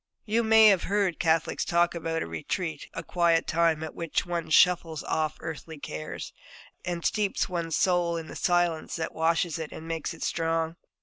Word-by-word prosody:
You 225 Hz, +2 st, +2 dB
may 220 Hz, -1 st, +7 dB
have 195 Hz, -4 st, +3 dB
heard 200 Hz, -4 st, 0 dB
Catholics 165 Hz, -1 st, +1 dB
talk 170 Hz, 0 st, +2 dB
about 165 Hz, -1 st, -2 dB
a -, -, -6 dB
'retreat,' 150 Hz, -, -4 dB
a -, -, -4 dB
quiet 170 Hz, -2 st, +2 dB
time 165 Hz, -1 st, +1 dB
in 160 Hz, -, -6 dB
which 165 Hz, -2 st, -2 dB
one 170 Hz, -2 st, -3 dB
shuffles 165 Hz, -1 st, +3 dB
off 155 Hz, -1 st, -1 dB
earthly 160 Hz, 0 st, -7 dB
cares, 80 Hz, -, -6 dB, 0.5 s
and 175 Hz, -1 st, -4 dB
steeps 210 Hz, -2 st, +1 dB
one's 170 Hz, -3 st, -2 dB
soul 175 Hz, -2 st, +2 dB
in 165 Hz, -, -5 dB
the -, -, -10 dB
silence 175 Hz, -2 st, +1 dB
that 160 Hz, -1 st, -3 dB
washes 165 Hz, +1 st, +1 dB
it 160 Hz, -, -5 dB
and 160 Hz, -, -9 dB
makes 165 Hz, -1 st, -3 dB
it -, -, -7 dB
strong. 165 Hz, 0 st, -1 dB
165 Hz, 180 wpm, -27 LUFS, 160-175 Hz, 0.5 s, may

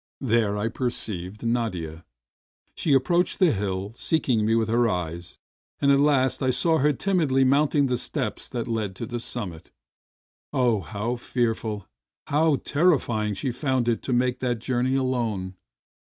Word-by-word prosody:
There 110 Hz, -5 st, +1 dB
I 105 Hz, +2 st, 0 dB
perceived 110 Hz, -5 st, -3 dB
Nadia. 90 Hz, -9 st, -2 dB, 0.7 s
She 150 Hz, -, 0 dB
approached 170 Hz, +7 st, +2 dB
the 180 Hz, -5 st, +4 dB
hill, 100 Hz, -1 st, -3 dB
seeking 125 Hz, -7 st, +1 dB
me 115 Hz, -, +3 dB
with 115 Hz, -1 st, +1 dB
her 115 Hz, +1 st, +2 dB
eyes, 85 Hz, -2 st, -4 dB, 0.4 s
and 140 Hz, -1 st, +4 dB
at 140 Hz, -, +5 dB
last 140 Hz, -2 st, +2 dB
I 130 Hz, -, +2 dB
saw 160 Hz, +6 st, +3 dB
her 150 Hz, +3 st, +4 dB
timidly 150 Hz, -5 st, +1 dB
mount 140 Hz, +3 st, +3 dB
ing 145 Hz, -1 st, +4 dB
the 125 Hz, -2 st, 0 dB
steps -, -, -4 dB
that 120 Hz, -2 st, -4 dB
led 110 Hz, -5 st, -2 dB
to 115 Hz, -, -5 dB
the 120 Hz, +1 st, -4 dB
summit. 100 Hz, -9 st, -5 dB, 0.8 s
Oh, 120 Hz, -4 st, +2 dB
how 110 Hz, +7 st, -3 dB
fearful, 115 Hz, -4 st, -2 dB, 0.4 s
how 150 Hz, +1 st, +3 dB
terrifying 130 Hz, -, +1 dB
she 135 Hz, +3 st, -2 dB
found 130 Hz, -1 st, 0 dB
it 115 Hz, -1 st, +1 dB
to -, -, -4 dB
make 125 Hz, 0 st, +1 dB
that 125 Hz, -2 st, 0 dB
journey 125 Hz, +2 st, 0 dB
alone! 115 Hz, -8 st, -1 dB
120 Hz, 155 wpm, -25 LUFS, 105-135 Hz, 0.8 s, at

